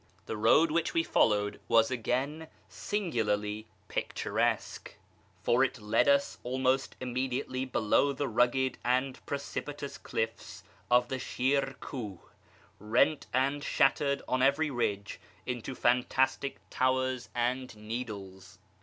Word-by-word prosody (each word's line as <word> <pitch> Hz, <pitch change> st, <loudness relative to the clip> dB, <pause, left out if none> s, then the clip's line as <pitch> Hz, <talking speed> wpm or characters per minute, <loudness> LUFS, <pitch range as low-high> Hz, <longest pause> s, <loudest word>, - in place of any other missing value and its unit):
The -, -, -4 dB
road 115 Hz, +9 st, +4 dB
which 165 Hz, +1 st, 0 dB
we 165 Hz, -, +3 dB
followed 105 Hz, -8 st, +2 dB
was 115 Hz, +1 st, +4 dB
again 135 Hz, +6 st, -1 dB, 0.2 s
singularly 110 Hz, -, -2 dB, 0.2 s
pictur -, -, -3 dB
esque, -, -, -1 dB, 0.5 s
for 125 Hz, +3 st, +4 dB
it 130 Hz, -2 st, -1 dB
led 105 Hz, +5 st, +2 dB
us 140 Hz, 0 st, +3 dB
almost 130 Hz, +1 st, 0 dB
immediately 130 Hz, +1 st, -2 dB
below 125 Hz, +3 st, +2 dB
the 140 Hz, +1 st, -2 dB
rugged 125 Hz, +3 st, +1 dB
and 130 Hz, +2 st, 0 dB
precipitous 140 Hz, 0 st, -5 dB
cliffs 110 Hz, 0 st, -4 dB, 0.3 s
of 125 Hz, 0 st, +4 dB
the 130 Hz, -, -2 dB
Shir 135 Hz, +2 st, 0 dB
Kuh, 110 Hz, -, -6 dB, 0.6 s
rent 120 Hz, +8 st, +2 dB
and 140 Hz, +2 st, +1 dB
shattered 140 Hz, 0 st, +2 dB
on 130 Hz, 0 st, +1 dB
every 140 Hz, +3 st, +3 dB
ridge 105 Hz, -5 st, -2 dB, 0.3 s
into 125 Hz, +1 st, -4 dB
fantastic 130 Hz, +3 st, +1 dB
towers 130 Hz, -1 st, 0 dB
and 120 Hz, 0 st, -1 dB
needles. 105 Hz, -5 st, -7 dB
130 Hz, 120 wpm, -30 LUFS, 115-135 Hz, 0.6 s, road